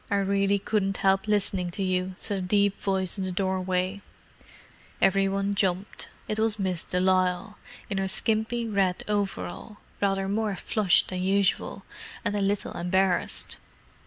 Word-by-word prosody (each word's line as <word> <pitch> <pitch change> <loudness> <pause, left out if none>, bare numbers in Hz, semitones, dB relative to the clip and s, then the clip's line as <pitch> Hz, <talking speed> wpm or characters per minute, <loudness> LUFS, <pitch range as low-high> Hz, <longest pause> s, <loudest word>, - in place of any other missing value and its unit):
"I 200 - +1
really 200 0 +2
couldn't 195 -1 0
help 195 +2 +2
listening 195 -3 +1
to 195 - 0
you," 185 0 -1
said 205 -2 -2
a - - -3
deep 200 +2 +2
voice 190 -1 0
in - - -1
the 185 - -2
doorway. 185 +1 -1 1.0
Every 195 0 +3
one 200 +1 0
jumped. 195 -1 -1 0.2
It 215 - -1
was 220 -1 +2
Miss 185 -4 -2
de 180 - -2
Lisle, 185 +2 +1 0.3
in 195 - -2
her 195 - 0
skimpy 220 +3 0
red 195 -4 +1
overall—rather 195 - -2
more 210 0 0
flushed 195 0 +2
than 185 -1 -3
usual, 195 +1 +1 0.4
and 205 - 0
a 205 - 0
little 200 +1 -1
embarrassed. 180 +1 +1
195 Hz, 150 wpm, -27 LUFS, 185-205 Hz, 1.0 s, Every